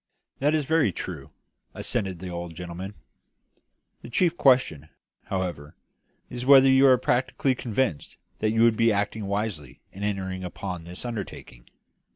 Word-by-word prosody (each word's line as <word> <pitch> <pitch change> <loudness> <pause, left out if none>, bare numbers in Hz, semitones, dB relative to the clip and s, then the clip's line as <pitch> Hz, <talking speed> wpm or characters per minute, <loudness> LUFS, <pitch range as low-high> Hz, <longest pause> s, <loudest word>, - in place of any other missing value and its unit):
"That 150 +3 +2
is 150 -2 0
very 160 -7 +2
true," 80 -6 -7 0.5
assented 95 -6 -2
the 90 +2 -7
old 85 -1 -6
gentleman. 90 +4 -7 1.1
"The - - -10
chief 170 +7 +2
question, 125 - +3 0.4
however, 90 -6 -4 0.5
is 125 - -6
whether 135 0 +7
you 135 +1 +6
are 130 -1 +6
practically 130 +2 +1
convinced 120 - -2 0.2
that 110 - +1
you 115 +1 +3
would 115 -1 +5
be 115 0 +4
acting 105 0 -1
wisely 100 - -3
in 95 - -11
entering 95 -2 -3
upon 90 -1 -6
this 90 +6 -8
undertaking. 100 - -7
100 Hz, 145 wpm, -26 LUFS, 90-125 Hz, 1.1 s, whether